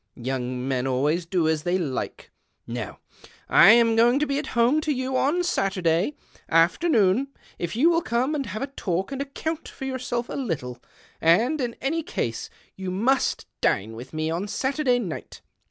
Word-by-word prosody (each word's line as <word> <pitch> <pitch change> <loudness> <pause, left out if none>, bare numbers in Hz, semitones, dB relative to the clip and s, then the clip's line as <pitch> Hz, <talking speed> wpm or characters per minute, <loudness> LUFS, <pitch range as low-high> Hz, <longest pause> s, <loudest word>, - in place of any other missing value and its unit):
Young 125 0 -3
men 130 -1 0
always 150 +7 0
do 170 -2 +1
as 160 -1 +1
they 175 +3 0
like. 145 -8 -4 0.3
Now, 115 -3 -5 0.5
I - - +7
am 230 -1 +4
going 240 +3 +5
to 300 - +1
be 280 -1 -1
at 305 - -5
home 245 +7 +4
to 305 - -1
you 260 -1 -2
on 310 +7 +2
Saturday 190 - 0 0.3
afternoon, 200 - +3 0.3
if 175 +3 -3
you 310 +9 +4
will 335 0 +2
come 255 +1 0
and 280 -4 -2
have 215 +6 -4
a 275 0 -6
talk 190 -3 -2
and 275 0 -3
account 310 +3 -4
for 270 - -8
yourself 250 -2 -3
a - - -7
little, 145 - -3 0.4
and, 230 - +3
in 240 -2 -2
any 315 +5 0
case, 325 - -3 0.3
you 190 -1 -5
must 235 +9 +1 0.2
dine 105 +3 +1
with 120 +4 -9
me 155 0 -2
on 175 +5 -2
Saturday 265 +3 +1
night. 190 -10 -6
225 Hz, 175 wpm, -25 LUFS, 165-270 Hz, 0.5 s, I